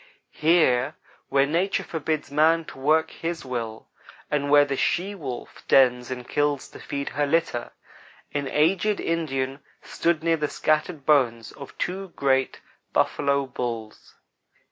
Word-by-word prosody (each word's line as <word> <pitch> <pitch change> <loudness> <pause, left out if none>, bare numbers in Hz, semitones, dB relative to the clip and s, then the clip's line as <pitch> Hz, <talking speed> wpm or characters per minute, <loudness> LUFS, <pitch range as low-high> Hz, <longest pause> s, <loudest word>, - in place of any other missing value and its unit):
Here, 155 -6 +3 0.3
where 135 0 +4
Nature 175 +7 0
forbids 155 -3 -3
man 160 +3 +3
to 135 - -11
work 155 +4 +2
his 165 -2 -5
will, 115 -4 -5 0.4
and 145 -1 0
where 145 0 +7
the 140 -1 -2
she 185 +8 0
wolf 135 -10 -7
dens 125 -2 +4
and 125 -1 -6
kills 145 -1 0
to - - -12
feed 140 0 -4
her 145 +1 -1
litter, 150 -6 0 0.6
an 145 -1 -1
aged 185 +9 +2
Indian 135 -5 -2 0.2
stood 170 -2 0
near 165 0 +2
the 150 -1 -1
scattered 155 -1 0
bones 120 -7 +2
of 140 - -11
two 190 +2 -3
great 135 -1 +1 0.3
buffalo 140 -1 +1
bulls. 120 -4 -6
145 Hz, 140 wpm, -25 LUFS, 130-160 Hz, 0.6 s, where